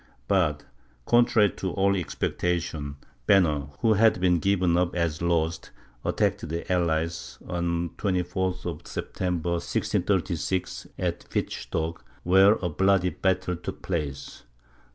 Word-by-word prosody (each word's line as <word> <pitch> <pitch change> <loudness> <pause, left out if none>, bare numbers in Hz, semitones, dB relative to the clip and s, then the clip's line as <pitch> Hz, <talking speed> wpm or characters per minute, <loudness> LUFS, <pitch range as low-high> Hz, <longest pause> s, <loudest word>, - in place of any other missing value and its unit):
But, 80 -7 +1 0.4
contrary 120 -4 +4
to 95 -2 -3
all 100 0 +2
expectation, 85 -4 -2 0.3
Banner, 75 -7 +4
who 110 -1 +4
had 110 -2 +4
been 90 -1 +3
given 90 -2 +2
up 90 0 +1
as 85 -2 -1
lost, 80 -1 0 0.3
attacked - - 0
the 85 +1 -3
allies, 85 -1 -1
on 85 -1 -1
the - - -25
24th 90 -1 -1
of 85 -4 -5
September, 90 -2 -2
1636, 85 +2 -1
at - - -3
Wittstock, 80 +1 -2 0.2
where 95 +3 +6
a - - +2
bloody 95 +2 +3
battle 95 -1 0
took 85 - -7
place. 70 -6 -4
90 Hz, 120 wpm, -26 LUFS, 85-95 Hz, 0.4 s, where